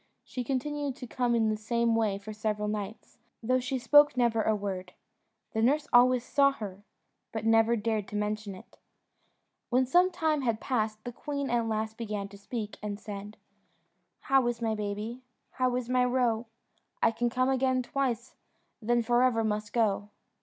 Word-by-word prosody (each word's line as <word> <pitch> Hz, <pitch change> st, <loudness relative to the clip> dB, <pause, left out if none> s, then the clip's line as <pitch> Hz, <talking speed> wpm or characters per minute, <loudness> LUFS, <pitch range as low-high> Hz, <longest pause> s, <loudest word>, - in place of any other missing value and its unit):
She 250 Hz, -, -5 dB
continued 280 Hz, +2 st, -2 dB
to 255 Hz, -, -8 dB
come 245 Hz, 0 st, 0 dB
in 225 Hz, -1 st, +2 dB
the 215 Hz, -, +1 dB
same 230 Hz, +1 st, 0 dB
way 215 Hz, -3 st, +1 dB
for 210 Hz, +2 st, -8 dB
several 210 Hz, 0 st, -2 dB
nights, 210 Hz, +2 st, -5 dB, 0.2 s
though 255 Hz, +3 st, +2 dB
she 255 Hz, +1 st, -2 dB
spoke 290 Hz, +2 st, +5 dB
never 235 Hz, -2 st, +3 dB
a 215 Hz, 0 st, +2 dB
word: 190 Hz, -3 st, -5 dB, 0.6 s
the 220 Hz, -, 0 dB
nurse 290 Hz, +5 st, +2 dB
always 245 Hz, 0 st, +6 dB
saw 275 Hz, +2 st, +3 dB
her, 200 Hz, -6 st, -7 dB, 0.5 s
but 220 Hz, -1 st, -4 dB
never 225 Hz, +1 st, +4 dB
dared 215 Hz, -2 st, -1 dB
to -, -, -7 dB
mention 210 Hz, -1 st, -2 dB
it. 185 Hz, -, -16 dB, 0.9 s
When 255 Hz, +1 st, +3 dB
some 355 Hz, +8 st, +4 dB
time 315 Hz, -4 st, 0 dB
had 230 Hz, -4 st, 0 dB
passed, 215 Hz, -4 st, -1 dB
the 245 Hz, -, -5 dB
queen 280 Hz, +1 st, -4 dB
at 235 Hz, -1 st, +1 dB
last 220 Hz, 0 st, -2 dB
began 210 Hz, -3 st, -3 dB
to 200 Hz, -, -12 dB
speak, 210 Hz, 0 st, -5 dB
and 205 Hz, -1 st, -4 dB
said 205 Hz, 0 st, -8 dB, 0.8 s
"How 270 Hz, -2 st, +3 dB
is 240 Hz, -1 st, -1 dB
my 225 Hz, -2 st, 0 dB
baby? 210 Hz, +3 st, -4 dB, 0.3 s
How 255 Hz, -1 st, 0 dB
is 250 Hz, -1 st, -2 dB
my 250 Hz, 0 st, +3 dB
roe? 245 Hz, -2 st, +1 dB, 0.6 s
I -, -, +5 dB
can 240 Hz, +1 st, 0 dB
come 255 Hz, +2 st, +1 dB
again 260 Hz, -1 st, +2 dB
twice, 245 Hz, -2 st, -2 dB, 0.5 s
then 240 Hz, +2 st, +2 dB
for 240 Hz, +1 st, +3 dB
ever 245 Hz, -3 st, +3 dB
must 210 Hz, -1 st, -2 dB
go." 210 Hz, -3 st, +1 dB
230 Hz, 175 wpm, -29 LUFS, 215-255 Hz, 0.9 s, always